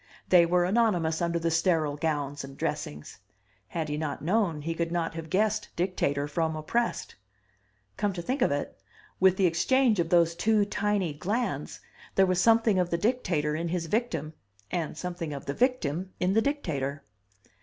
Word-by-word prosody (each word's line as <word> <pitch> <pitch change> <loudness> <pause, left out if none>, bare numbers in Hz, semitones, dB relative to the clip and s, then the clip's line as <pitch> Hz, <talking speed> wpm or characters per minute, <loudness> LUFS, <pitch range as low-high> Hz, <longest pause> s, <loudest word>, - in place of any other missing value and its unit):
They 175 -2 +6
were 175 0 +3
anonymous 180 -6 +1
under 170 0 0
the 165 0 0
sterile 160 -3 +2
gowns 145 -3 -2
and 135 0 -10
dressings. 75 0 -4 0.5
Had 160 -2 -3
he 150 0 -2
not 150 -3 -4
known, 175 -4 +1
he 165 +2 -2
could 170 0 -2
not 170 -2 -1
have 160 -1 -7
guessed 215 +3 +1
dictator 145 -6 0
from 160 +1 -1
oppressed. 230 +10 -2 0.8
Come 205 - +1
to 175 - -4
think 260 +9 -2
of - - +3
it, 145 0 -3 0.4
with 190 0 +5
the 195 - +3
exchange 220 +6 +3
of 165 -1 0
those 170 -1 +4
two 210 +4 +2
tiny 205 -5 0
glands 210 +11 -3 0.3
there 195 - +5
was 185 0 +1
something 225 -3 +4
of 180 -1 +1
the 170 - 0
dictator 170 -9 0
in 165 +2 -2
his 170 0 -2
victim 165 - -2 0.4
and 165 -3 -2
something 175 -4 -4
of 140 - -7
the 140 - -2
victim 190 - 0
in 185 +1 +1
the 225 - +4
dictator. 150 - -2
170 Hz, 175 wpm, -28 LUFS, 155-205 Hz, 0.8 s, They